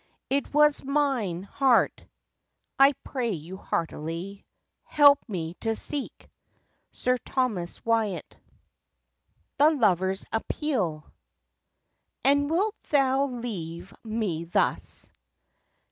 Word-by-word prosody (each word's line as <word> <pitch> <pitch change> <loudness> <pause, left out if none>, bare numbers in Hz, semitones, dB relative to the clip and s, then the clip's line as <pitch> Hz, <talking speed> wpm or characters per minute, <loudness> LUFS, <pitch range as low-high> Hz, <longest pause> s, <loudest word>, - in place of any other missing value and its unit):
It 280 +1 0
was 300 0 +4
mine 265 - 0
heart! 255 +3 +2 0.8
I 275 +1 +7
pray 240 -5 -2
you 170 +3 -7
heartily 170 +4 -4 0.4
Help 285 -1 +6
me 170 -5 -3
to 225 -1 0
seek! 285 +4 -5 0.6
Sir 250 0 0
Thomas 220 -12 -2
Wyatt. 220 -6 0 1.2
THE 295 +2 +7
LOVER'S 190 - +1
APPEAL. 220 - -1 1.2
And 285 +1 +3
wilt 395 +6 0
thou 275 -1 +3
leave 195 -9 -6
me 215 -8 -2
thus? 170 - 0
230 Hz, 90 wpm, -27 LUFS, 180-275 Hz, 1.2 s, I